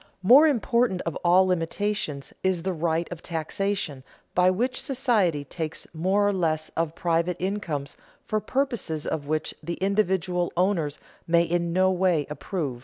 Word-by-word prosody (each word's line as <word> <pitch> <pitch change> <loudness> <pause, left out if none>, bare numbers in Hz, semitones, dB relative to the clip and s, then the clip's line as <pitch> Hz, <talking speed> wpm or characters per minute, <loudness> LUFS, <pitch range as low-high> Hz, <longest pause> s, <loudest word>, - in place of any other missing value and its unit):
Most 275 +11 +8
important 235 -6 +1
of 165 - -3
all 180 +2 +4
limitations 180 -4 -2
is 185 -3 0
the 190 0 -1
right 165 0 0
of 175 -1 -6
taxation, 165 -3 -3 0.3
by 180 0 +4
which 245 +8 0
society 225 - +1
takes 155 +3 -5
more 190 +5 +2
or 205 - +2
less 160 -4 0
of 165 -1 -2
private 170 +1 0
incomes 170 -8 -3 0.3
for 215 - 0
purposes 235 - -2
of 145 -3 -3
which 155 +1 -1
the 170 +2 -4
individual 190 -3 0
owners 175 -6 +1 0.3
may 170 0 +4
in 170 0 -1
no 185 +2 +3
way 180 -5 +2
approve. 150 -5 -4
180 Hz, 150 wpm, -26 LUFS, 160-200 Hz, 0.3 s, Most